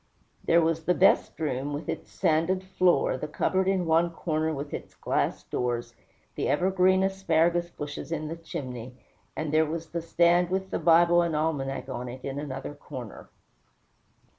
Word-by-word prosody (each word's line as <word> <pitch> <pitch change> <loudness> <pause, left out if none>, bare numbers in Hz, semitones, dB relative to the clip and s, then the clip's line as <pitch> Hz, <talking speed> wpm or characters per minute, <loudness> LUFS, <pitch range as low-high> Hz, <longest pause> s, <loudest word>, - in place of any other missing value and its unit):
There 170 +1 +4
was 165 0 0
the 180 - +3
"best 190 -3 +3
room," 145 -2 -2
with 145 +3 -5
its - - -5
sanded 180 +2 +1
floor, 185 -7 +2
the 150 - -4
cupboard 185 +5 0
in 190 -2 +1
one 165 +1 +3
corner 160 -1 -1
with 145 -1 -5
its - - -7
glass - - -1
doors, 120 -1 -2 0.4
the - - -2
ever 185 +2 +2
green 185 0 +4
asparagus 175 -3 +1
bushes 145 0 -7
in 155 -2 -2
the 165 - -4
chimney, 130 -8 -7 0.4
and 155 -1 -3
there 155 0 +4
was 165 +1 -5
the 170 - -3
stand 170 +1 +3
with 190 +1 -2
the - - -1
Bible 170 +1 +5
and 170 -2 0
almanac 145 -4 -1
on 125 -2 -5
it 130 +1 -9
in 140 0 -3
another 135 -1 -5
corner. 130 -6 -9
160 Hz, 170 wpm, -27 LUFS, 145-175 Hz, 0.4 s, Bible